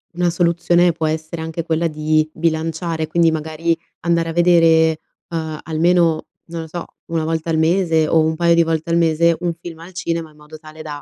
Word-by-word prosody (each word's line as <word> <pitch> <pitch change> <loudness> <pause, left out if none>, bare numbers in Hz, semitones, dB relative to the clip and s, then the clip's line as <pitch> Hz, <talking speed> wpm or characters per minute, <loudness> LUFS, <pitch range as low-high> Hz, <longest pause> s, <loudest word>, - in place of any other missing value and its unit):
una 175 0 +1
soluzione 175 +1 +2
può 160 -1 -3
essere 160 +1 -3
anche 160 +1 -4
quella 165 0 0
di 155 0 0
bilanciare, 160 0 -2
quindi 170 -1 +3
magari 160 +1 -1 0.2
andare 170 -1 +1
a - - -4
vedere, 165 -2 +4 0.3
ehm, 160 -2 -4
almeno, 165 0 +2 0.2
non 165 0 -5
lo 160 - -8
so, 175 +2 -6 0.3
1 165 -1 0
volta 160 +1 -2
al 160 - +1
mese 165 -1 +2
o 160 - +4
un 160 0 +1
paio 170 0 +3
di 170 - +5
volte 165 +1 -2
al 170 - +2
mese, 165 0 +3
un 175 -1 -1
film 165 -1 -10
al 175 +3 -12
cinema 165 -3 -3
in 150 - -23
modo 150 +1 -13
tale 155 0 -12
da, 145 -2 -7
165 Hz, 200 wpm, -19 LUFS, 160-170 Hz, 0.3 s, di